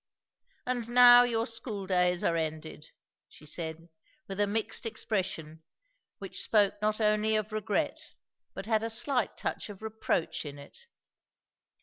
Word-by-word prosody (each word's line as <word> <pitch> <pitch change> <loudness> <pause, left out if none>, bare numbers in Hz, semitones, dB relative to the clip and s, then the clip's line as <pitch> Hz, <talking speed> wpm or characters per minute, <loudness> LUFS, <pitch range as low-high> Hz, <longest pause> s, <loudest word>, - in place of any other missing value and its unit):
"And 245 -2 -2
now 245 0 +9
your 230 -2 +1
school 225 -3 -4
days 180 -1 +2
are 165 - +2
ended!" 155 -1 -4 0.4
she 150 - -15
said, 160 +1 -5 0.4
with 195 0 -6
a 205 - +3
mixed 220 +2 -1
expression 185 -8 -3 0.6
which - - -4
spoke 205 -3 +3
not 215 +1 0
only 215 0 +2
of 215 0 -2
regret 215 -1 -2 0.4
but - - -5
had 220 -1 +1
a 225 - -3
slight 240 +2 -1
touch - - -4
of 205 +1 -11
reproach 220 -6 -2
in 145 -2 -8
it. 145 - -14
210 Hz, 140 wpm, -29 LUFS, 175-225 Hz, 0.6 s, now